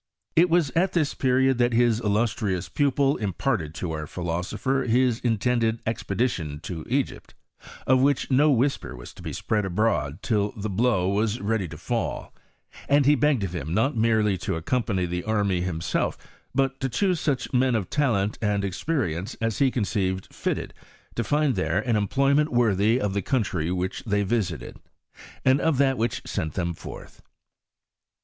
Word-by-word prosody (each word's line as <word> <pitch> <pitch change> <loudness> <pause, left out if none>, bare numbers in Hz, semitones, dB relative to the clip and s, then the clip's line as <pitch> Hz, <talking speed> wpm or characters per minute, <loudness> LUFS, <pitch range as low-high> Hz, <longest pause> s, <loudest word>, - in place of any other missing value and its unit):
It 175 +2 +5
was 165 -5 +2
at 180 +6 +1
this 155 -5 +1
period 130 0 +2
that 120 0 +3
his 115 -1 +3
illustrious 105 -4 0
pupil 140 - +2
imparted 95 - -2
to 90 - -3
our 75 -1 -4
phi 90 - -6
losopher 95 +11 -1
his 120 0 +2
intended 115 0 +1
expedition 100 - -2
to 80 -2 -6
Egypt, 135 +2 -2 0.5
of 130 0 +4
which 140 0 +1
no 145 +4 +5
whisper 135 +1 0
was - - -10
to - - -13
be - - -5
spread 105 -1 -1
abroad 95 -5 0
till 105 -3 0
the 105 0 -3
blow 95 -3 +2
was 105 +3 0
ready 105 -2 -1
to - - -9
fall; - - -3 0.6
and 140 0 +4
he 145 - +6
begged 145 -4 +2
of 95 -2 -3
him 80 0 -3
not 130 +7 +2
merely 110 -4 +2
to 90 - -2
accompany 95 +1 -1
the 90 0 -3
army 100 -4 0
himself, 85 -2 -1 0.4
but 135 -1 +1
to 135 - -1
choose 180 - +1
such 140 -4 -1
men 125 -1 +3
of 100 -5 -1
talent 110 -8 +1
and 105 -2 0
experience 100 - -2
as 115 -2 -1
he 135 -2 +4
conceived 100 -6 -2
fitted - - -3 0.4
to 115 - -1
find 150 +1 +2
there 90 -2 0
an 115 +1 0
employment 140 +8 +2
worthy 115 -1 +3
of 105 -6 -1
the 100 - 0
country 95 - -1
which 95 +8 -2
they 105 -2 +1
visited, 100 -6 -2 0.7
and 130 +1 +4
of 160 -4 +2
that 135 -1 +3
which 115 -1 -2
sent 80 -7 -3
them 85 -1 -1
forth. - - -11
110 Hz, 170 wpm, -25 LUFS, 95-130 Hz, 0.7 s, he